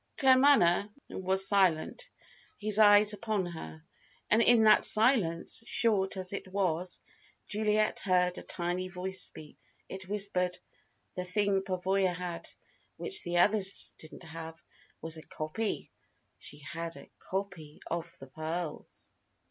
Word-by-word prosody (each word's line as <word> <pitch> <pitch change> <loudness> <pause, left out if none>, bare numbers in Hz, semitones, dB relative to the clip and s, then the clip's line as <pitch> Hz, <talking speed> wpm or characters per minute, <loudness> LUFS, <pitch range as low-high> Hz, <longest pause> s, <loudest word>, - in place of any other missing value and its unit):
Claremanagh 260 -9 +4 0.2
was 190 +1 +3
silent, 195 - +1 0.5
his 215 0 +1
eyes 210 0 +6
upon 210 -2 -2
her. 80 - -9 0.5
And 220 - +4
in 230 -1 +5
that 215 -1 +6
silence, 215 -5 +3
short 200 -4 +1
as 185 +1 -3
it 200 - -6
was, 185 -2 -2 0.5
Juliet 215 0 0
heard 180 -1 +1
a - - -9
tiny 180 0 -3
voice 185 +1 -3
speak. 150 -1 -6 0.3
It 190 0 -9
whispered: 195 -3 +1 0.6
"The 180 - -4
thing 195 +1 0
Pavoya 190 -1 -1
had, 175 -1 -6 0.5
which 410 -2 0
the 175 -1 -3
other 205 +4 +4 0.4
didn't 160 +3 -13
have, 165 0 -9 0.4
was 160 0 -2
a - - -11
copy. 155 +9 -5 0.5
She 145 - -9
had 165 +3 -7
a - - -14 0.2
copy 180 -6 -5
of 170 -1 -4
the 135 - -10
pearls." 155 +3 -7
185 Hz, 130 wpm, -30 LUFS, 170-205 Hz, 0.6 s, eyes